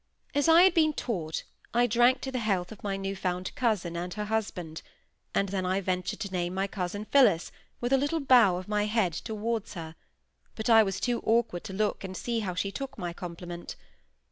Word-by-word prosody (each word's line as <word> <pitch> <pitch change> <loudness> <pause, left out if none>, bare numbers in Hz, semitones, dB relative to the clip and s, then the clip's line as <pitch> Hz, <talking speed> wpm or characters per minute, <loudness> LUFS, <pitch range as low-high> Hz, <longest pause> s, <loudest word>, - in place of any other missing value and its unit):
As 285 +2 +2
I 330 +2 +8
had 375 -1 +6
been 310 -3 +3
taught, 170 - -3 0.3
I 240 +1 +5
drank 240 +2 +4
to 265 - -4
the 255 - -2
health 195 -5 -1
of 220 - -11
my 200 -1 -1
newfound 190 -2 -3
cousin 215 -10 0
and 175 +1 -4
her 210 -1 -3
husband; 190 -7 -3 0.5
and 200 - +2
then 190 -1 -1
I 185 +1 +1
ventured 185 -1 -2
to 200 - -4
name 180 -1 -2
my 195 +1 +1
cousin 200 +1 -4
Phillis 215 -11 +4 0.3
with 245 +2 0
a 270 - +5
little 290 +4 0
bow 245 - +5
of 180 +1 -6
my 210 0 +1
head 210 -6 +1
towards 220 +3 -3
her; 160 -2 -6 0.6
but 220 +1 -1
I 225 -1 +9
was 195 -3 -1
too 245 -2 0
awkward 225 -6 +1
to 190 - -6
look 205 +1 -1
and 190 -1 -6
see 235 -1 -1
how 190 -5 -3
she 195 +2 -1
took 275 +5 -6
my 175 -4 -4
compliment. 175 -1 -7
205 Hz, 205 wpm, -28 LUFS, 180-235 Hz, 0.6 s, I